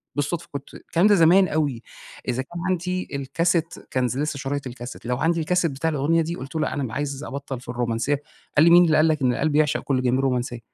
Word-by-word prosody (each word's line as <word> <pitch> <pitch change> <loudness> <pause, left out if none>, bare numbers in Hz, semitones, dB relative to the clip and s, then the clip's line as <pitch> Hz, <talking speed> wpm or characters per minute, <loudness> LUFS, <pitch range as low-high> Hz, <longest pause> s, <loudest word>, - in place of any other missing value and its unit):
بالصدفة 155 +4 -2
كنت 140 -1 -7
الكلام 175 +5 +1
ده 205 - +6
زمان 180 +2 +6
أوي، 145 -7 -1 0.5
إذا 125 0 0
كان 170 +6 -8
عندي 185 0 -1
الكاسيت 165 +4 0 0.2
كان 130 -1 +1
ذ 125 +2 -2
لسّه 150 -1 -2
شرايط 140 0 -3
الكاسيت، 120 0 -9
لو 125 +1 -1
عندي 165 +3 +1
الكاسيت 170 0 +1
بتاع 140 +4 -1
الأغنية 155 +3 +1
دي، 165 +2 -3
قلتُ 135 0 -9
له: 160 - 0
"لأ، - - -1
أنا 130 -6 -3
عايز 140 0 -3
أبطّل 135 -2 -5
في 125 - -14
الرومانسيّة." 120 +4 -1 0.4
قال 150 - +7
لي: - - +7
"مين 175 +1 +8
اللي 155 -2 +3
قال 155 - +5
لك 155 -2 +1
إن 125 -2 +3
القلب 150 +3 0
يعشق 150 -1 +3
كل 130 -2 0
جميل، 125 +1 +1
رومانسيّة؟" 125 -2 -1
145 Hz, 230 wpm, -23 LUFS, 130-165 Hz, 0.5 s, مين